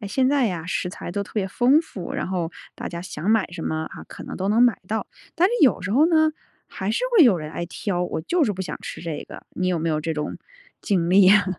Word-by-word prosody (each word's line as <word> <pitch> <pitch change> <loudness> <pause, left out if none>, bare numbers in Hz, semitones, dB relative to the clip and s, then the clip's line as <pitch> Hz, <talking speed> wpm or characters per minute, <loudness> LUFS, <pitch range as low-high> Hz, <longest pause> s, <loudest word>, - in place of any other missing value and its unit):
诶， 205 - -6
现 260 +4 +2
在 275 -2 +3
呀， 175 -6 -3
食 180 - -1
材 175 -1 -7
都 200 - -1
特 200 - -13
别 205 -3 0
丰 250 +8 +4
富， 190 - -7
然 - - -2
后 180 -3 -2 0.2
大 - - -5
家 170 0 -6
想 180 +1 -3
买 225 -1 +3
什 175 - -6
么 160 0 -2
啊， - - -9
可 - - -9
能 - - -7
都 190 +1 -2
能 220 +3 +4
买 245 -4 +4
到。 220 +1 -2 0.3
但 350 - +4
是 410 - -1
有 260 -9 +4
时 185 - -3
候 290 +7 +5
呢， 315 -2 +4 0.4
还 190 +2 -4
是 225 - 0
会 405 -8 +7
有 235 -9 +6
人 155 -1 -6
爱 170 - -4
挑： 180 0 -2
“我 170 - -3
就 345 - +1
是 225 -8 +2
不 190 - -4
想 185 - -5
吃 - - -7
这 165 -3 -4
个。” - - -10
你 185 0 0
有 180 -2 +1
没 165 +1 -1
有 155 -1 0
这 160 +1 -2
种 150 -1 -4 0.4
经 175 -4 0
历 195 +2 +7
呀？ 200 +2 +6
190 Hz, 290 characters per minute, -23 LUFS, 170-240 Hz, 0.4 s, 会